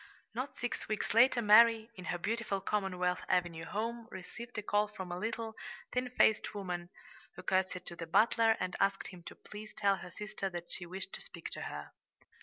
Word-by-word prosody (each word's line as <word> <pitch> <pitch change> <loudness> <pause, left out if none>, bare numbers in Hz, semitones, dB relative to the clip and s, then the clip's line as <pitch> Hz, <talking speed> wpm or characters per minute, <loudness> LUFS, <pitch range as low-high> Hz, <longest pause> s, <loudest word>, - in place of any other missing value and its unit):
Not 255 +5 -4
six 245 - -3
weeks 215 -1 -1
later 240 +1 +6
Mary, 225 +1 +7
in 185 - -9
her 175 - -1
beautiful 215 +1 -1
Commonwealth 185 -3 0
Avenue 170 -2 +1
home, 230 +2 -3
received 235 +5 -8
a 210 - -2
call 205 +1 +2
from 190 -4 -7
a 175 - -3
little, 225 +2 -3 0.4
thin 250 0 0
faced 220 -4 +3
woman, 180 -3 -3 0.5
who - - -9
curtsied 185 -1 +1
to 170 - -6
the 165 -1 -6
butler 225 +4 +4
and 185 -1 -2
asked 195 0 +1
him 180 -2 -11
to - - -8
please 215 +1 -10
tell 200 -2 +3
her 180 - -8
sister 205 0 -4
that 175 -1 -7
she 175 - -5
wished 190 +2 -6
to - - -6
speak - - -8
to - - -5
her. 75 0 -6
205 Hz, 195 wpm, -34 LUFS, 180-225 Hz, 0.5 s, Mary